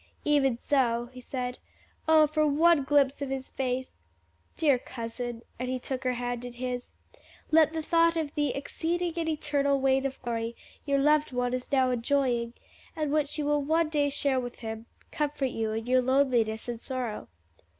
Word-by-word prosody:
"Even 275 -5 +3
so," 240 -3 +1
he 255 - -10
said. 250 -1 -4 0.5
"Oh, 315 -1 +7
for 305 +1 +1
one 315 +1 +4
glimpse 280 -1 +3
of 280 - -2
His 265 0 -4
face! 260 -1 -2 0.6
Dear 285 -6 +3
cousin," 235 -1 -6 0.2
and 250 0 -2
he 255 - -1
took 260 +1 -5
her 255 - +2
hand 245 0 -3
in 245 -1 -7
his, 250 0 -5 0.6
"let 315 -1 +6
the 320 -1 -3
thought 335 +1 +3
of 310 -2 -2
the 295 -1 +1
'exceeding 340 +5 -2
and 330 -1 0
eternal 280 -2 +1
weight 270 0 +2
of 265 - -9
glory' 230 0 -2 0.3
your 280 0 +3
loved 300 +1 +3
one 245 0 -1
is 255 +2 -4
now 260 -2 +3
enjoying, 245 -1 0 0.4
and 305 -2 -1
which 300 0 0
you 300 - -1
will 295 0 +2
one 320 +3 +1
day 290 -2 +1
share 275 -2 +1
with 245 -1 -5
him, 220 +1 -5 0.2
comfort 290 -3 -1
you 220 -1 -2
in 220 +1 -3
your 255 +1 +3
loneliness 245 -4 +2
and 235 -1 -4
sorrow." 250 -5 -4
265 Hz, 180 wpm, -28 LUFS, 245-295 Hz, 0.6 s, Oh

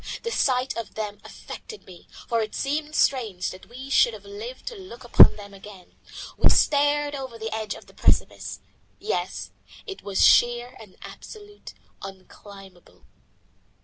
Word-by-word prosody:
The 465 - -2
sight 255 - +1
of 230 -2 -6
them 210 -1 -4
affected 435 - -10
me, 180 -2 -14 0.2
for 230 -1 +1
it 215 -1 -4
seemed 300 +2 -2
strange 220 -9 +1
that 185 - -12
we 255 +3 -9
should 235 -4 +4
have 205 -1 -13
lived 215 +6 -8
to 475 - -10
look 370 - -11
upon 240 - +8
them 200 -1 -11
again. 195 -2 -13 0.4
We - - +6
stared 290 0 +3
over 260 -4 -6
the 225 -1 -4
edge 220 -1 -3
of - - -13
the - - -19
precipice. - - 0 0.4
Yes, 430 - -3 0.3
it 390 -3 -7
was 200 -2 +2
sheer 240 +1 +4
and 210 -4 -14
absolutely 415 -1 -11 0.3
unclimbable. 195 -1 -13
235 Hz, 150 wpm, -25 LUFS, 205-285 Hz, 0.4 s, upon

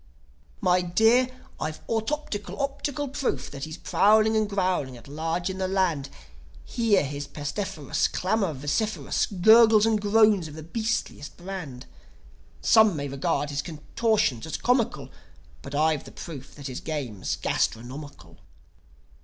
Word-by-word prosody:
"My 180 -2 +3
dear, 225 +8 +4 0.3
I've 155 0 -5
autoptical, 220 -5 -3
optical 280 0 -2
proof 275 0 -2
That 140 -1 -5
he's 155 +1 -8
prowling 215 +4 +3
and 215 -1 +1
growling 185 -10 -1
at 115 - -15
large 165 +4 -2
in 190 0 -4
the 190 - 0
land. 180 -8 0 0.6
Hear 225 -7 +2
his 145 0 -5
pestiferous 150 +2 -2
Clamour 190 -4 -1
vociferous, 145 +11 -1
Gurgles 220 +3 +6
and 220 -2 +2
groans 210 -4 +4
of 150 - -10
the 160 - -8
beastliest 220 -5 -3
brand. 175 -9 -7 0.8
Some 220 -5 +5
may 140 -1 -3
regard 140 +1 -1
his 145 0 -1
contortions 160 - -1
as 160 - -3
comical. 245 -2 0 0.5
But 140 +1 -7
I've 155 0 +2
the - - -11
proof 140 -5 -9
that 145 - -11
his 130 -2 -4
game's 135 -11 -3
gastronomical. 120 - -3
180 Hz, 135 wpm, -26 LUFS, 145-220 Hz, 0.8 s, Gurgles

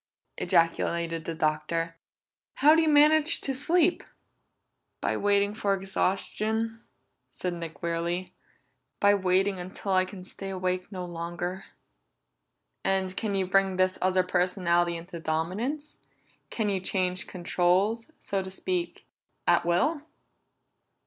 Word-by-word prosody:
ejaculated 165 0 +1
the 165 - -4
Doctor. 160 +1 -1 0.6
"How 300 +2 +6
do 325 - +5
you 320 - +2
manage 305 +2 +5
to 270 - -2
sleep?" 330 +6 +2 1.0
"By - - -1
waiting 200 0 +2
for 200 -2 0
exhaustion," 215 +4 -1 0.5
said 180 -1 -4
Nick 165 -1 -8
wearily. 170 +2 -2 0.7
"By 205 0 +5
waiting 190 0 +2
until 185 +2 -5
I 185 0 +4
can 185 -1 -10
stay 195 +1 -7
awake 185 0 -2
no 185 -2 -5
longer." 175 +2 -5 1.2
"And 190 -1 0
can 210 -1 -2
you 190 -1 +1
bring 190 0 +2
this 185 0 +2
other 185 0 +3
personality 175 -1 +1
into 170 +1 -8
dominance? 185 - -3 0.5
Can 220 -2 -1
you 195 -1 0
change 185 -1 -1
controls, 185 - +1
so 195 -1 -2
to 190 - -6
speak, 350 - -3 0.4
at 170 - +3
will?" 285 - +2
185 Hz, 120 wpm, -28 LUFS, 175-205 Hz, 1.2 s, How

